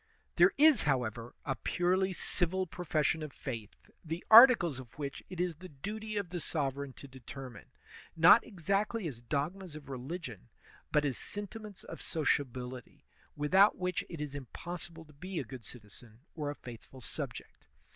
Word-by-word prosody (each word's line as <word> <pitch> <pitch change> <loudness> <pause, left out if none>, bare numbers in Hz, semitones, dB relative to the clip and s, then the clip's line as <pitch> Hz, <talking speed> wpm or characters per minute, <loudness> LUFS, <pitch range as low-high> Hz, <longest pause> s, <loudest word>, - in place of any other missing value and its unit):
There 175 +2 +7
is, 300 -4 +7
however, 120 -4 -1
a 135 - 0
purely 185 - +1
civil 185 +1 0
profession 160 -3 0
of 155 -2 -5
faith, 115 -8 -6 0.3
the 165 +2 -5
articles 220 - +9
of 125 -3 -12
which 140 -2 -4
it 180 -2 -7
is 175 -3 -1
the 185 +2 -10
duty 210 +9 -5
of 200 -4 -2
the 175 - -3
sovereign 140 -4 -2
to 140 - -11
determine, 130 -2 -10 0.5
not 170 +7 +8
exactly 200 +2 -1
as 120 -6 -7
dogmas 155 +7 -3
of 145 -3 -10
religion, 130 - -6 0.4
but 150 -1 +3
as 135 -4 -1
sentiments 205 0 -7
of - - -8
sociability, 130 -5 -2 0.3
without 190 +8 +5
which 180 0 -1
it 165 - -7
is 150 -2 -4
impossible 165 +5 -7
to 150 - -18
be 180 +5 -6
a 150 - 0
good 125 -2 -10
citizen 110 0 -12
or 150 -2 -3
a 145 - -4
faithful 125 +1 -11
subject. - - -7
155 Hz, 155 wpm, -32 LUFS, 130-185 Hz, 0.5 s, articles